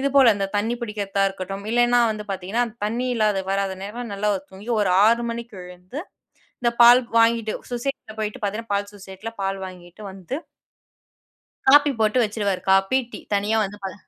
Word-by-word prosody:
இதுபோல 275 -2 +5
அந்த 200 -1 -1
தண்ணி 225 +4 0
பிடிக்கிறதா 205 -3 -2
இருக்கட்டும், 195 +1 -6
இல்லனா, 240 +1 +4
வந்து 210 0 -7
பாத்தீங்கன்னா 195 +6 -1 0.2
தண்ணி 235 +4 -1
இல்லாத 215 -3 +2
வராத 195 0 0
நேரம் 230 +2 -6
நல்லா 205 +1 -1 0.2
தூங்கி 195 +4 -12
ஒரு 195 - +2 0.2
6:00 235 +1 +3
மணிக்கு 230 -2 -7
எழுந்து, 180 +9 -9 0.6
இந்த 235 -1 +2
பால் 240 +2 +9 0.2
வாங்கிட்டு, 230 -1 +3 0.2
சொசைட்டில 240 -3 -4
போயிட்டு 215 +4 -4
பாத்தீங்கன்னா, 210 +2 -3
பால் 200 0 -1
சொசைட்டியில 195 +3 -9
பால் 195 0 -2
வாங்கிட்டு 180 +2 -12
வந்து 190 +6 -6 1.3
காப்பி 290 +1 +7
போட்டு 215 +2 +2
வச்சுருவாரு. 205 -3 -1
Copy, 195 +6 +4
tea. - - -7 0.2
தனியா 205 +2 +1
வந்து 205 0 -5
பால 190 -1 -4
210 Hz, 160 wpm, -23 LUFS, 195-235 Hz, 1.3 s, பால்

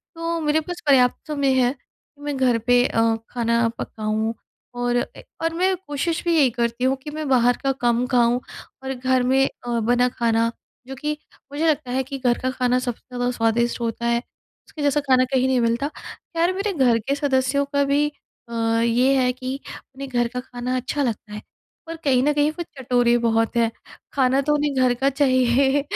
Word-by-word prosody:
तो 330 0 -2
मेरे 300 0 +2
पास 355 +3 -7
पर्याप्त 255 +1 +3
समय 280 -3 +1
है 245 0 +3
कि 290 0 -29
मैं 290 -1 -3
घर 250 -3 +3
पे 245 0 +5
अ, 225 0 +2
खाना 235 -1 +1
पकाऊँ। 220 +1 -2 0.4
और 245 0 0
अ, 245 - +1 0.4
और 330 0 0
मैं 370 +2 +1
कोशिश 295 +3 -2
भी 340 -1 +2
यही 280 -5 +5
करती 235 +1 -2
हूँ 260 +1 +3
कि 300 - -6
मैं 305 -1 -4
बाहर 245 -1 +4
का 275 - +2
कम 240 +1 +2
खाऊँ 245 -1 +3 0.4
और 265 0 -3
घर 255 0 +1
में 265 +2 +3
अ, 240 -1 -4
बना 245 +2 +2
खाना 230 -1 +1 0.4
जो 270 - -6
कि 300 +3 -3 0.3
मुझे 300 +3 0
लगता 295 -5 0
है 260 +1 0
कि 275 +1 -6
घर 245 -2 +2
का 255 - -1
खाना 250 -1 +1
सबसे 245 -2 -4
ज़्यादा 245 0 0
स्वादिष्ट 235 +1 0
होता 235 0 -3
है, 235 0 +2 0.5
उसके 300 - -9
जैसा 290 +1 +2
खाना 260 -2 +3
कहीं 260 0 +3
नहीं 260 -1 +2
मिलता। 235 +5 0 0.5
यार 345 +2 +2
मेरे 395 +2 -2
घर 255 -7 +3
के 280 - +1
सदस्यों 280 0 +1
का 280 0 +3
भी 285 +1 +2 0.4
अ, - - -8 0.3
ये 245 +4 +3
है 250 -1 +2
कि 255 +2 -5 0.4
उन्हें 275 0 -7
घर 240 -2 +1
का 250 - -2
खाना 250 0 -4
अच्छा 270 +3 -2
लगता 215 -4 -3
है। 210 - -6 0.5
पर 330 - -5
कहीं 260 -3 +3
न 295 +1 +3
कहीं 295 +1 +2
वो 345 +2 -5
चटोरे 245 -2 +2
बहुत 225 -1 +1
है, 230 -1 +2 0.4
खाना 265 0 +3
तो 295 +2 +1
उन्हें 290 -1 0
घर 255 -2 +3
का 275 - +4
चाहिए 265 0 +3
255 Hz, 200 wpm, -22 LUFS, 240-285 Hz, 0.5 s, पे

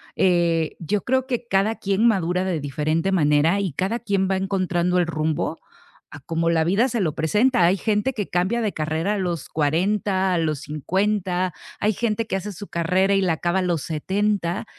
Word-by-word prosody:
eh, 170 -3 +2
yo 195 +4 -1
creo 260 +1 +1
que 245 -2 -3
cada 200 +2 +1
quien 200 +3 0
madura 180 -4 +1
de 180 -4 -1
diferente 155 +5 -1
manera 155 +3 +3
y 190 -4 -2
cada 195 - -1
quien 200 -4 0
va 190 - +1
encontrando 180 -2 0
el 175 - +2
rumbo 155 -2 -2 0.5
a 145 - -9
como 165 +4 -1
la 165 -1 +2
vida 200 +10 +2
se 230 -2 -1
lo 160 -5 0
presenta, 210 - +2
hay 180 +3 +3
gente 215 +6 0
que 210 -5 -3
cambia 190 +7 0
de 215 -3 -1
carrera 160 +5 -1
a - - -1
los 175 -5 -3
40, 185 +5 0
a 175 - +1
los 155 -3 -1
50, 185 +4 -1 0.3
hay 210 +1 +1
gente 230 +1 -1
que 215 - -3
hace 195 +2 -4
su 200 +2 -9
carrera 185 +4 +1
y 195 - +3
la 180 -3 +2
acaba 175 +3 0
a - - +1
los 175 -5 -1
70 190 +3 -1
185 Hz, 195 wpm, -23 LUFS, 165-205 Hz, 0.5 s, manera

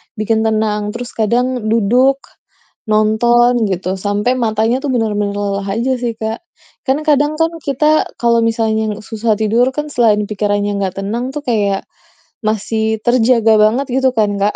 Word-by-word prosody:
bikin 220 +1 0
tenang, 215 -1 -1
terus 245 0 -6
kadang 240 +1 -1
duduk, 245 +5 +3 0.7
nonton 230 +2 +3
gitu 185 0 -2
sampai 205 +4 0
matanya 225 +2 +1
tuh - - -2
benar-benar 210 -3 -1
lelah 200 -1 -3
aja 255 +3 0
sih, 235 -2 -3
Kak. 220 +1 -4 0.5
Kan, 285 +3 +1
kadang 295 +1 +2
kan, 325 +1 +2
kita 300 +3 +2
kalau 235 -1 +3
misalnya 220 -1 0
lu 215 - -10
susah 220 -1 -1
tidur 225 +4 +2
kan, 300 0 -3
selain 215 -5 +2
pikirannya 205 -1 -1
gak 190 +1 -3
tenang 240 +6 -3
tuh 295 - -4
kayak 205 -5 0 0.6
masih 220 +1 -1
terjaga 235 -2 +3
banget 225 +6 +3
gitu 260 0 +2
kan, 205 -2 +1
Kak. 205 +1 0
220 Hz, 155 wpm, -16 LUFS, 210-245 Hz, 0.7 s, duduk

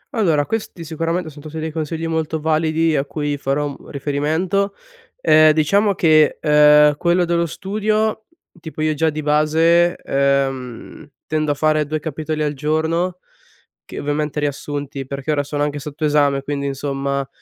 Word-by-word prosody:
Allora, 165 -10 +2
questi 215 -5 -4
sicuramente 165 +1 -3
son 145 0 -13
tutti 155 +1 -8
dei 160 0 -3
consigli 160 +1 -4
molto 160 -1 -2
validi 160 +1 +1
a 135 - +1
cui 145 0 -3
farò, 140 +1 -1
mhmm, 140 - -12
riferimento. 160 +8 -1 0.5
Ehm, 155 - +6
diciamo 200 +7 +2
che, 155 -3 +4
ehm, 150 -1 +5
quello 175 +2 +2
dello 170 0 0
studio 215 +5 -1 0.3
tipo 160 -1 -8
io, 155 0 +1
già 160 +2 +1
di 155 0 -5
base, 160 +3 +3
ehm, 135 0 -2 0.2
tendo 155 -1 -1
a - - -1
fare 155 0 +1
2 155 +1 -2
capitoli 155 0 -3
al 150 -1 -1
giorno, 160 +5 -1 0.7
che - - -8
ovviamente 150 +1 -2
riassunti, 145 -1 -4
perché 140 +2 -4
ora 145 -1 +1
sono 145 +1 -2
anche 145 0 -2
sotto 150 +2 -5
esame, 145 -2 +2
quindi 140 0 -3
insomma, 140 0 -2
155 Hz, 155 wpm, -19 LUFS, 145-165 Hz, 0.7 s, Ehm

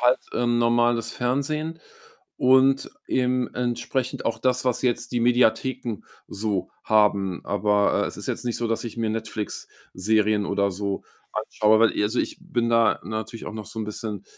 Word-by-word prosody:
halt, 125 +1 +4
äh, 120 - 0
normales 120 0 +2
Fernsehen 150 +6 -1 0.6
und 130 +1 +4 0.2
eben 125 -1 +1
entsprechend 125 +1 -2
auch 115 0 0
das, 130 +1 +1
was 125 - +1
jetzt 125 -1 0
die 120 - +1
Mediatheken 120 -1 +1 0.3
so 100 -2 -2 0.2
haben. 100 -4 +2
Aber, 105 0 +2
äh, - - -1
es - - -6
ist - - -5
jetzt - - -3
nicht 120 - -1
so, 120 - -1
dass 115 +1 -1
ich 115 0 -6
mir 115 -1 0
Netflix-Serien 110 -1 -1
oder 100 0 +1
so 100 +1 -3 0.3
anschaue, 110 0 +2
weil 115 0 +5
ich - - -1
also, 110 +4 -1
ich - - -2
bin 120 -1 -1
da 115 -1 +3
natürlich 110 +1 -5
auch - - -5
noch 110 -1 -6
so 110 - -7
'n 110 - -1
bisschen, 105 -1 -5
115 Hz, 170 wpm, -24 LUFS, 105-125 Hz, 0.6 s, weil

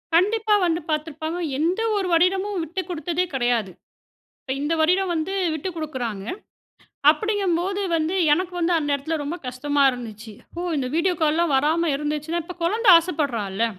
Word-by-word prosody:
கண்டிப்பா 425 +4 +3
வந்து 330 -1 +1
பார்த்துருப்பாங்க. 315 +2 -3 0.2
எந்த 355 +7 +1
ஒரு 390 -2 0
வருடமும் 375 +3 +2
விட்டு 350 +4 -4
கொடுத்ததே 350 +1 -1
கிடையாது. 240 -6 0 0.7
இப்ப 265 - -4
இந்த 295 +3 0
வருடம் 365 +4 +2
வந்து 325 +3 -2 0.2
விட்டு 315 +4 -4
கொடுக்குறாங்க. 245 -11 -4 0.9
அப்டிங்கம்போது 390 +1 0 0.2
வந்து 320 +3 -1 0.2
எனக்கு 360 +3 0
வந்து 345 +1 +2
அந்த 290 -2 -2
இடத்துல 285 +4 -2
ரொம்ப 295 +4 -4
கஷ்டமா 285 +3 0
இருந்துச்சு. 225 -3 -8 0.3
ஓ - - -2 0.2
இந்த 270 -3 -1
வீடியோ 355 +3 +2
கால்லாம் 315 0 +2
வராம 315 +4 +2
இருந்துச்சுன்னா, 300 +3 -2
இப்ப 360 +2 -8
குழந்த 435 +8 0
ஆசப்படுறால்ல? 235 - -1
320 Hz, 145 wpm, -23 LUFS, 285-360 Hz, 0.9 s, கண்டிப்பா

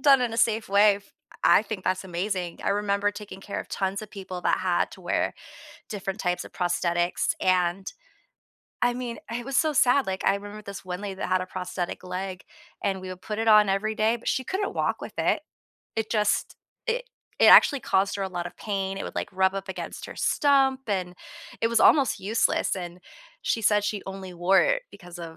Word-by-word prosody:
done 275 -1 +6
in 245 -2 0
a - - -4
safe 225 -2 +2
way. 200 +1 +5
F 200 0 -17 0.3
I - - +6
think 205 -3 -6
that's 185 +1 0
amazing. 180 -1 -3
I - - +2
remember 205 0 +1
taking 205 -2 -9
care 200 - -5
of - - -10
tons 195 0 -2
of 215 -1 -10
people 185 -3 -7
that - - +2
had - - +1
to - - -12
wear - - 0 0.5
different 195 -1 -4
types 180 -1 -1
of - - -12
prosthetics 175 -1 0
and, 185 +1 +1 0.9
I 245 0 +3
mean, 245 -1 -5
it 240 +1 -3
was 275 +1 -2
so 310 -1 +3
sad, 265 0 +4
like, 190 0 -3
I 195 - +3
remember 205 +1 -8
this 200 -2 -9
one 180 +1 -5
lady 200 -2 -5
that - - -4
had 185 0 +2
a - - -3
prosthetic 180 -1 -4
leg, 185 +1 -5 0.4
and 190 -1 -1
we 185 - -7
would 185 0 -8
put 210 +2 -4
it 225 - -1
on 210 -1 +7
every 215 +3 0
day, 220 +2 +2
but 235 - -12
she 260 - +1
couldn't 390 +6 -2
walk - - 0
with - - -7
it. - - +1 0.5
It 220 0 -2
just 210 -2 +1 0.3
it - - -1 0.3
it - - +6
actually 280 - +8
caused 195 -1 +1
her 200 - -3
a 190 - -2
lot 175 -2 -4
of 175 - -10
pain, 195 -2 -3
it - - -4
would, - - -7
like, - - -2
rub 190 0 +2
up 195 0 -5
against 190 - -6
her - - -10
stump, 270 -2 +3
and 185 -3 -1 0.5
it 230 - +2
was 235 - +2
almost 280 -3 +5
useless 215 +1 +1
and 175 -1 -6 0.4
she 225 - 0
said 210 0 +3
she 205 -1 -2
only 190 -1 -7
wore 175 +3 +4
it - - +2
because 175 -3 -12
of, 165 -1 -8
200 Hz, 215 wpm, -26 LUFS, 185-220 Hz, 0.9 s, actually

